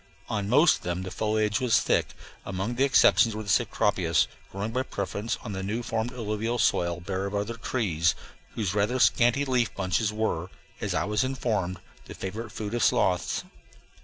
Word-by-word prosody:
On 105 -3 -2
most 150 +7 +5
of - - -19
them 90 +1 -3
the 95 - -6
foliage 110 0 0
was 125 -3 +3
thick; - - 0 0.3
among 95 +5 -3
the 130 +3 +1
exceptions 120 -4 +5
were 110 - -4
the 100 - -8
cecropias, - - +2 0.3
growing 100 +3 -3
by 130 +3 0
preference 105 -2 -3
on 110 - -6
new 100 +5 -3
formed 115 +1 -2
alluvial 115 0 -2
soil 85 -6 +1
bare 95 +2 -3
of 100 - -5
other 100 +3 -1
trees, 100 -9 0 0.4
whose 100 -5 -1
rather 105 +5 +1
scanty 120 +2 +3
leaf 125 -4 +1
bunches 100 +3 0
were, 105 -5 -2 0.3
as - - -1
I - - +1
was 105 +4 +1
informed, 110 -9 -1 0.3
the - - -9
favorite 110 +4 -5
food 105 +1 -5
of 120 - 0
sloths. 90 -1 +2
105 Hz, 175 wpm, -27 LUFS, 95-120 Hz, 0.4 s, most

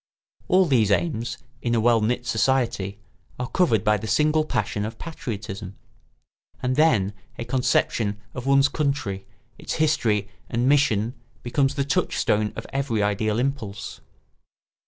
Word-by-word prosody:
All 185 +1 +5
these 120 - +3
aims, 120 +2 0 0.2
in 120 -1 0
a - - +3
well 115 0 +4
knit 120 +3 0
state, 115 -4 0 0.4
are 125 - -3
covered 120 - +2
by 105 -1 +3
the 110 +2 -6
single 155 +5 +3
passion 110 -7 -2
of 110 +1 -5
patriotism; 100 - -6 0.9
and 130 0 +1
then 115 -11 +3 0.2
a 120 - -4
conception 115 -4 +1
of 125 0 -6
one's 140 0 +5
country, 140 -11 -2 0.3
its - - -4
history 115 -10 +1 0.2
and 120 +1 0
mission 125 -6 +3 0.3
becomes 135 +3 +1
the 140 - 0
touchstone 105 -5 +1
of - - -6
every 135 -6 0
ideal 105 +1 0
impulse. 120 -6 -3
120 Hz, 135 wpm, -24 LUFS, 105-140 Hz, 0.9 s, All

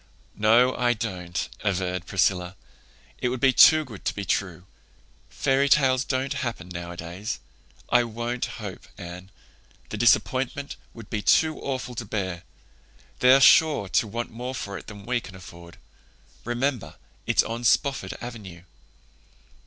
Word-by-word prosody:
"No, 120 +4 +4
I 120 -1 +2
don't," 90 -6 -4 0.2
averred 90 -3 -1
Priscilla. 90 -1 0 0.6
"It 125 - 0
would 130 0 -3
be 130 +1 +4
too 155 +3 +7
good 110 -7 -11
to - - -1
be 100 - -4
true. 90 -3 -2 0.6
Fairy 135 +1 +1
tales 130 -3 +4
don't 130 +1 -1
happen 115 -8 -4
nowadays. 85 +3 -6 0.5
I 120 0 +4
won't 120 +2 -3
hope, - - -8
Anne. 90 +2 -9 0.6
The - - -5
disappointment 130 +4 +1 0.2
would 115 -3 -12
be 105 - -1
too 155 +10 +3
awful 130 -2 -4
to 120 - -5
bear. 95 -4 -3 0.8
They're 130 +2 +6
sure 145 -5 +5
to 100 +5 +2
want 115 +3 -4
more 125 +3 -5
for 100 -4 -5
it - - -9
than 100 -2 -10
we 125 0 0
can 95 - -11
afford. 85 -2 -13 0.7
Remember, 120 +1 -2 0.3
it's - - +4
on 115 +1 -5
Spofford 140 +3 +1
Avenue." 105 -8 -9
115 Hz, 140 wpm, -25 LUFS, 95-125 Hz, 0.8 s, too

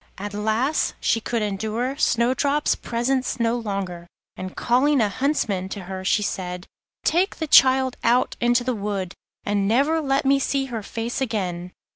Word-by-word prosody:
At 205 +1 -6
last 220 +8 0
she 225 - +1
could 230 0 -1
endure 220 +6 -2
Snowdrop's 280 +3 +2
presence 255 +2 -1
no 230 0 +1
longer, 195 -6 -4 0.3
and, 185 0 -7
calling 265 +4 +3
a 215 -3 +2
huntsman 200 -6 -1
to 200 - -6
her, 190 +1 -6
she 210 +2 +2
said: 180 -2 -4 0.4
'Take 360 +4 +2
the 320 - -3
child 260 -3 +5
out 240 +2 +2
into 240 0 +3
the 255 0 -1
wood, 200 -4 -3 0.3
and 200 -1 0
never 285 +9 +2
let 270 -1 0
me 275 +1 +4
see 275 0 0
her 225 - -2
face 230 +5 -4
again. 180 -7 -2
230 Hz, 160 wpm, -23 LUFS, 200-265 Hz, 0.4 s, child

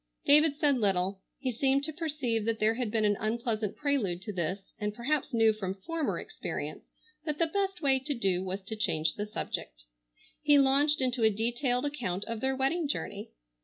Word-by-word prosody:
David 300 0 +6
said 290 -4 +3
little. 190 -2 +1 0.2
He 260 -2 -2
seemed 270 +3 +2
to 315 +2 -1
perceive 285 -9 -1
that 225 0 0
there 220 0 +3
had 240 -1 -2
been 215 0 +1
an 205 0 +3
unpleasant 220 -1 -1
prelude 220 -12 -1
to 210 - -5
this, 185 +2 -3
and 210 0 -2
perhaps 275 +5 -1
knew 225 -2 +4
from 195 -3 -4
former 315 +10 -2
experience - - -6 0.3
that 300 -2 -3
the 335 - +3
best 385 0 -2
way 270 -2 +4
to 285 +2 -3
do 190 -5 0
was 190 +1 -4
to 210 +3 -5
change 160 -7 0
the 210 0 -4
subject. - - -5 0.6
He 295 -1 +5
launched 280 +2 +4
into 250 -2 +1
a 220 - +6
detailed 240 +5 0
account 225 -10 -2
of 230 -1 -4
their 265 +3 0
wedding 285 +5 +1
journey. 285 - -4
235 Hz, 190 wpm, -30 LUFS, 210-285 Hz, 0.6 s, David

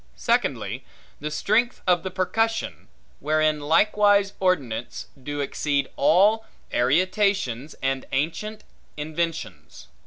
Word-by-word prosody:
Secondly, - - -1 0.4
the 150 - -4
strength 215 +10 0
of 180 -2 +3
the 190 - -4
percussion; 220 +5 -1 0.3
wherein 155 +1 +1
likewise 200 +6 +3
ordnance 135 -12 -1 0.2
do 145 +2 -4
exceed 140 0 -1
all 205 +9 +4 0.3
arietations 155 - +1
and 135 0 -1
ancient 170 +10 -2 0.3
inventions. 150 - -4
160 Hz, 95 wpm, -24 LUFS, 140-200 Hz, 0.4 s, all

